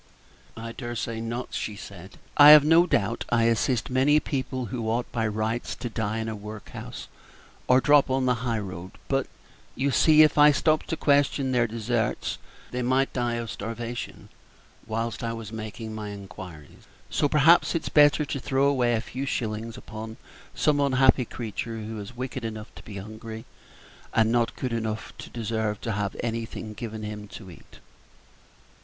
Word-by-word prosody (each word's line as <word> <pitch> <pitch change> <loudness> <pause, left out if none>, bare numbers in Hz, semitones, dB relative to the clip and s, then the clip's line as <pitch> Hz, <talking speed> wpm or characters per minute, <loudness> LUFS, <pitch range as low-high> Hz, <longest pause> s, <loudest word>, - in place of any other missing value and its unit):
"I 115 0 -6
dare 120 0 -6
say 115 -1 -3
not," 115 +2 -4
she 105 - -3
said; 100 -2 -11 0.2
"I 145 0 +9
have 150 -1 +10
no 165 +3 +6
doubt 105 - 0
I 120 -1 +3
assist 115 +2 +1
many 140 +4 +4
people 130 -3 -3
who 115 -3 -2
ought 120 +2 0
by 115 -2 0
rights 110 +2 -2
to 120 -2 -6
die 110 0 -2
in 110 0 -3
a 110 - -3
workhouse 105 0 -8 0.6
or 125 0 +6
drop 145 0 +5
on 130 0 +1
the 125 - +3
high 120 -3 -1
road; 95 -3 -6
but, - - 0 0.5
you 140 +2 0
see, 155 +2 +6
if 155 -1 +3
I 150 0 +8
stopped 155 +2 +1
to 165 - -2
question 140 -2 +2
their 120 -2 +2
deserts, 115 0 -2 0.3
they 125 - -2
might 130 +2 +1
die 120 -2 0
of 115 -2 -4
starvation 115 +3 -6 0.6
while 115 +1 -2
I 115 -1 -2
was 115 -2 -7
making 110 0 -6
my 105 -1 -5
inquiries; 95 -6 -10 0.2
so 145 - +1
perhaps 165 +5 +5
it's 165 - -2
better 150 0 +5
to 140 - -3
throw 135 +1 +1
away 125 -4 +2
a 110 - 0
few 130 +4 -5
shillings 115 -1 -3
upon 110 -2 -8 0.4
some 150 -1 +2
unhappy 130 -2 +4
creature 115 0 -5
who 110 0 -6
is 105 +4 -9
wicked 130 0 -4
enough 110 -1 -6
to - - -11
be 100 -2 -9
hungry, 110 +2 -8 0.7
and 110 0 +4
not 120 -1 +1
good 125 -2 -3
enough 110 -1 -3
to - - -8
deserve 110 -2 -2
to 115 - -2
have 100 -1 -2
anything 115 -2 -4
given 110 -1 -6
him 105 0 -6
to 100 -2 -10
eat." - - -16
115 Hz, 175 wpm, -26 LUFS, 110-130 Hz, 0.7 s, have